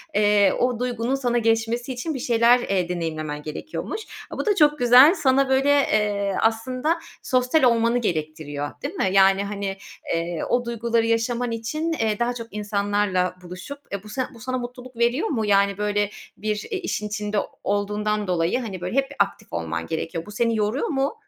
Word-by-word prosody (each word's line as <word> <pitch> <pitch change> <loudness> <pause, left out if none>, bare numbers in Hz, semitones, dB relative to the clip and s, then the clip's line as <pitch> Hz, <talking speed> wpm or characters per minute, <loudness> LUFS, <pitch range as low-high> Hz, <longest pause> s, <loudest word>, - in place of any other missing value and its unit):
eee, 205 -2 +4
o 245 -1 +1
duygunun 245 +1 -1
sana 245 -3 0
geçmesi 230 +2 0
için 285 +6 -3
bir 270 - -4
şeyler, 235 0 +4
eee, 190 -6 -1
deneyimlemen 155 -4 -3
gerekiyormuş. 310 - -5 0.3
A, - - -7
bu - - -2
da 420 -2 +3
çok 300 -3 +4
güzel. 250 +6 +8
Sana, 270 -4 +2
böyle, 265 +2 +3
eee, 210 -8 +2
aslında 255 +8 0 0.2
sosyal 255 +4 +2
olmanı 235 -1 +4
gerektiriyor. 155 -7 -3
Değil 285 +5 -3
mi? 195 - +1
Yani, 195 0 +5
hani, 200 -1 -4 0.4
eee, 170 0 -2
o 245 0 +1
duyguları 235 -1 0
yaşaman 235 +1 0
için, 305 +9 -2
eee, 220 -8 0
daha 240 +1 +1
çok 230 -2 -7
insanlarla 205 -3 0
buluşup, 180 +11 -8
eee, 200 -1 -4
bu 210 - -12
san 255 +4 -2
bu 235 - -14
sana 255 +2 -3
mutluluk 250 0 -8
veriyor 240 - +1
mu? 225 - -1
Yani, 200 -1 +3
böyle, 205 0 0 0.3
bir, 215 0 -3
eee, 400 - -1
işin 210 - -3
içinde 210 0 -3 0.3
olduğundan 210 +1 -1
dolayı, 175 +5 +1
hani, 200 -7 -6
böyle, 180 +6 -4
hep 270 0 +2
bir - - -10
aktif 200 0 -1
olman 85 -1 -3
gerekiyor. 165 +1 -4
Bu 210 - -10
seni 230 +2 +1
yoruyor 215 +6 0
mu? 275 -1 0
225 Hz, 180 wpm, -23 LUFS, 200-250 Hz, 0.4 s, güzel